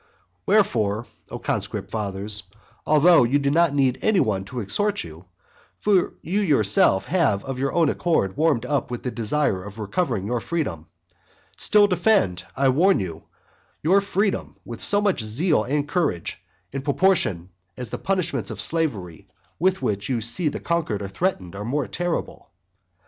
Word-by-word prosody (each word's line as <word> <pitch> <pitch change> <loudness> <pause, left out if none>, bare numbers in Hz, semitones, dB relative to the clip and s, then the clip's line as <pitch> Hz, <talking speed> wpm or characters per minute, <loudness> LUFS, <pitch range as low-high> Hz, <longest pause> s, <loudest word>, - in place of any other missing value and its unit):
II. - - -36 0.2
Wherefore, 115 - +2 0.2
O - - -5
conscript - - -3
fathers, 105 0 -2 0.5
although 155 0 +6
you 125 +4 +2
do 140 -1 0
not 165 -1 +3
need 135 -3 +2
any 215 -3 +3
one 100 - 0
to 125 +5 -6
exhort 205 - -1
you, 80 +3 -12 0.5
(for 200 -4 +1
you 190 +5 -1
yourself 105 - +3
have 145 - +1
of 135 -1 -5
your 135 0 0
own 170 -2 +2
accord 130 - 0
warmed 150 -5 +1
up 140 -1 -1
with 120 -1 -5
the 125 - -2
desire 115 -4 -1
of 100 +2 -10
recovering 110 - -2
your 120 +3 -1
freedom,) 110 - -3 0.7
still 210 -1 +4
defend, 180 - +1
I 135 0 +3
warn 175 +9 +3
you, 85 -4 -6 0.6
your 190 +6 +4
freedom 200 0 -1
with 115 -2 -8
so 205 0 +5
much 200 -7 +1
the - - -5
more - - -3
zeal 155 - +2
and 145 +2 -1
courage, 150 - -2 0.3
in 135 - -4
proportion 140 - +1 0.3
as 125 -3 -6
the - - -4
punishments 185 -3 -1
of - - -7
slavery 105 - -1 0.3
with 190 +3 +1
which 100 +2 -2
you 125 -3 0
see 120 +10 +1
the - - -2
conquered 155 -12 -2
are 100 - -5
threatened 95 - -2
are 100 - -5
more 130 +4 -1
terrible. 175 -1 -4
135 Hz, 170 wpm, -23 LUFS, 105-175 Hz, 0.7 s, although